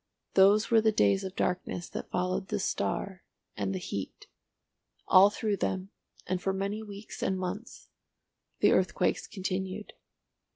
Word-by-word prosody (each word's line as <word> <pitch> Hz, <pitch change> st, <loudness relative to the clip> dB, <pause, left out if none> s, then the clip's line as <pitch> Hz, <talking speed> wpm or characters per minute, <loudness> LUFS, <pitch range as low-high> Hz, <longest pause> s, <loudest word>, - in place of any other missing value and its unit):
Those 200 Hz, +4 st, +5 dB
were 225 Hz, -1 st, +6 dB
the 220 Hz, 0 st, +4 dB
days 100 Hz, -, +3 dB
of 190 Hz, 0 st, -6 dB
darkness 180 Hz, -1 st, -2 dB
that -, -, -6 dB
followed 185 Hz, +1 st, -1 dB
the -, -, -1 dB
star 180 Hz, -, -2 dB, 0.3 s
and -, -, -2 dB
the 190 Hz, -, -2 dB
heat. 100 Hz, -, -6 dB, 0.8 s
All 190 Hz, +2 st, +8 dB
through 210 Hz, 0 st, -1 dB
them, 190 Hz, +1 st, -2 dB, 0.3 s
and 180 Hz, 0 st, -2 dB
for 190 Hz, +1 st, 0 dB
many 200 Hz, +3 st, -2 dB
weeks 205 Hz, 0 st, -9 dB
and 190 Hz, -, 0 dB
months, 185 Hz, +5 st, -6 dB, 0.7 s
the -, -, +6 dB
earthquakes -, -, +1 dB
continued. 190 Hz, 0 st, -4 dB
190 Hz, 140 wpm, -29 LUFS, 185-205 Hz, 0.8 s, All